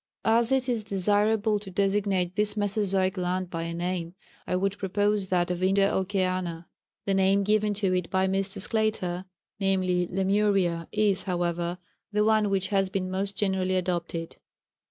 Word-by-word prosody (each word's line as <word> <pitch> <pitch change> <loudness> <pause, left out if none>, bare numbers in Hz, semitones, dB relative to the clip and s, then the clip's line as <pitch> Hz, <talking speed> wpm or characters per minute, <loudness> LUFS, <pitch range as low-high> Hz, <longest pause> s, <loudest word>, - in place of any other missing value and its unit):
As 230 +2 +3
it 265 -1 +2
is 235 -3 0
desirable 210 +2 +2
to 200 -1 -9
designate 195 -1 0
this 210 0 +1
Mesozoic 195 -2 +1
land 180 0 -2
by 165 -1 -3
a 165 - -4
name, 175 0 -3 0.3
I - - 0
would 195 +2 -1
propose 205 +1 0
that 180 -1 +1
of 180 0 -3
Indo 195 +1 +3
Oceana. 185 -3 -1 0.4
[The 195 - +1
name 195 +1 +3
given 210 0 +1
to 195 -2 0
it 180 -2 -1
by 190 0 +1
Mr. 195 +1 -1
Sclater, 195 -4 -1 0.3
viz., 185 -2 +1
Lemuria, 190 -3 +1
is, 205 -3 +2
however, 175 0 -1 0.3
the 210 0 +2
one 215 -1 +3
which 195 -1 0
has 195 -2 +1
been 185 -1 -3
most 195 +1 -2
generally 190 -2 0
adopted. 175 -2 -3
190 Hz, 155 wpm, -27 LUFS, 180-205 Hz, 0.4 s, As